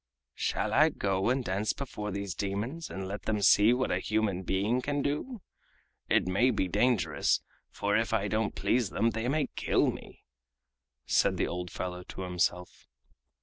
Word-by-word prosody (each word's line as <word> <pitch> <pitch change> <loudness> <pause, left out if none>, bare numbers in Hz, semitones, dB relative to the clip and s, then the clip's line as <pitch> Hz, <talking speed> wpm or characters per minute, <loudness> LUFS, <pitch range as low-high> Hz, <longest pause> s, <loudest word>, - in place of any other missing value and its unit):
"Shall - - -1
I - - +6
go 95 +1 0
and 130 0 0
dance 100 +3 0
before 105 -6 -5
these 100 -2 -3
demons 105 +12 -3
and 95 0 -5
let 100 +2 -6
them 105 -1 0
see 105 +3 +6
what 125 +1 +1
a 90 - +1
human 105 -2 0
being 100 +7 0
can 145 +1 -1
do? 185 - -3 0.7
It - - +3
may 95 +8 +3
be 105 -6 0
dangerous, 120 +4 +2 0.3
for 100 0 -1
if 115 +1 +1
I 105 -2 +1
don't 110 +1 -1
please 120 -5 +1
them 115 +4 +1
they 110 +2 -3
may 145 +2 +1
kill - - +2
me!" - - -12 0.8
said - - +2
the - - +1
old 90 0 -4
fellow 90 +1 -5
to 95 - -9
himself. 90 0 -2
105 Hz, 170 wpm, -30 LUFS, 95-125 Hz, 0.8 s, I